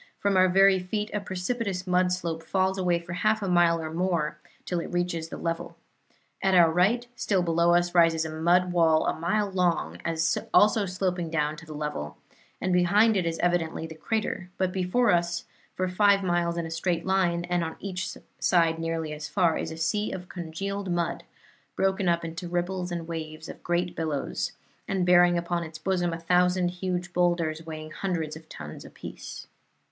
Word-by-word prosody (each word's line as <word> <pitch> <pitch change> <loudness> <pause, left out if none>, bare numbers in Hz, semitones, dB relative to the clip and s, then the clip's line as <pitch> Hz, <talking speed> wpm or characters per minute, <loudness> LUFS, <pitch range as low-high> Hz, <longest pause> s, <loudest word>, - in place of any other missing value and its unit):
From 200 -1 +1
our 185 0 +5
very 195 +1 +5
feet 210 +4 -3
a 210 - 0
precipitous 190 0 -3
mud 180 0 +2
slope 170 -3 -2
falls 190 +3 0
away 180 -2 +2
for 170 +1 -7
half 215 +3 +1
a - - -1
mile 175 -2 +4
or 160 -1 -5
more 165 -4 -1 0.3
till 175 - -1
it - - -6
reaches 175 -2 -1
the - - -6
level. 165 0 -4 0.6
At 190 -1 +3
our 170 -2 +6
right, 200 +9 +2
still 190 -6 +1
below 170 0 +3
us, 175 0 +1
rises 165 -2 +4
a 160 - -4
mud 175 +3 +2
wall 165 -2 +3
a - - +1
mile 195 +5 0
long, 170 - 0 0.6
also 210 -1 +5
sloping 180 -2 -2
down 155 -1 0
to 165 +1 -12
the 155 - -8
level, 75 - -4 0.4
and 185 - 0
behind 205 +5 +4
it 180 -4 +1
is 165 0 -2
evidently 175 -2 0
the 160 - -8
crater; 185 +2 -3
but 185 -1 +1
before 190 +6 +2
us, 170 0 0 0.3
for 185 - 0
five 200 +1 +3
miles 175 -1 0
in 170 - -2
a 165 - -6
straight 165 0 -1
line, 180 -3 +1
and 175 -1 0
on 160 0 -4
each 185 -1 -4 0.2
side 165 -2 +3
nearly 165 -1 -2
as 150 0 -6
far, 175 -3 +2
is - - -3
a 160 - -7
sea 205 +6 0
of 180 -1 -7
congealed 195 +3 -4
mud, 175 -1 -1 0.5
broken 190 -1 +1
up 170 0 +1
into 165 +2 -6
ripples 180 +1 -2
and 170 -1 -4
waves 160 -1 -6
and - - -9
great 175 +1 -1
billows, 155 -4 -2 0.3
and 190 -2 0
bearing 175 0 +5
upon 170 0 -1
its 160 -1 -8
bosom 175 +1 0
a 165 - -3
thousand 180 +1 +2
huge 180 0 -3
boulders, 170 -3 +1
weighing 155 -1 -7
hundreds 165 -4 -3
of 160 0 -13
tons 75 -2 -8
apiece." - - -9
175 Hz, 185 wpm, -27 LUFS, 165-185 Hz, 0.6 s, our